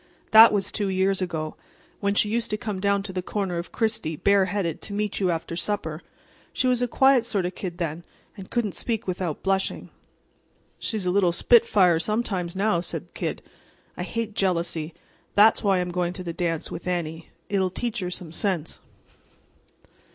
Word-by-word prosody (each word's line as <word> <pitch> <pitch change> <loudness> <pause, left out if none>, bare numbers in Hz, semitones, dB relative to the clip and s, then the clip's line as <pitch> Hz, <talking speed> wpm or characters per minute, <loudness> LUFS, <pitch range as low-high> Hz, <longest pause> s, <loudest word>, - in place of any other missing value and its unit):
"That 220 +1 +10
was 205 -2 -1
two 205 -2 -1
years 190 0 +1
ago, 160 -4 -3 0.4
when 200 0 0
she 210 - +4
used 230 +2 -1
to 210 - 0
come 210 -2 -4
down 200 0 +1
to 195 -2 -5
the 185 - -2
corner 185 -2 -2
of 170 - -7
Chrystie 220 -9 -1
bare 200 +4 +3
headed 180 -4 -2
to 205 - -7
meet 210 0 -2
you 190 -2 +1
after 165 0 -2
supper. 170 -4 -2 0.5
She - - 0
was 250 -1 +3
a 245 - +2
quiet 265 0 +4
sort 205 -6 -1
of - - 0
a - - -13
kid 180 -2 -6
then, 170 -1 -3 0.3
and 195 -3 -10
couldn't 235 -4 0
speak 225 -3 -2
without 180 -4 -3
blushing." 195 0 -1 0.9
"She's 215 -5 -2
a 180 - +2
little 185 -2 +3
spitfire, 190 -4 +4
sometimes, 190 -3 -1
now," 195 -2 +2
said 175 - -4
the - - -39
Kid. - - -4 0.5
"I - - -6
hate 230 -2 -3
jealousy. 170 -4 -1 0.4
That's 215 +3 +6
why 195 -2 +3
I'm 180 0 -1
going 175 0 -1
to 185 - -7
the 170 -1 -4
dance 165 -2 -2
with 175 - -7
Annie. 165 -2 -3 0.2
It'll 190 -2 +1
teach 235 +5 -3
her 180 -2 -3
some 175 -2 -6
sense." 170 -2 -2
190 Hz, 190 wpm, -25 LUFS, 175-210 Hz, 0.9 s, That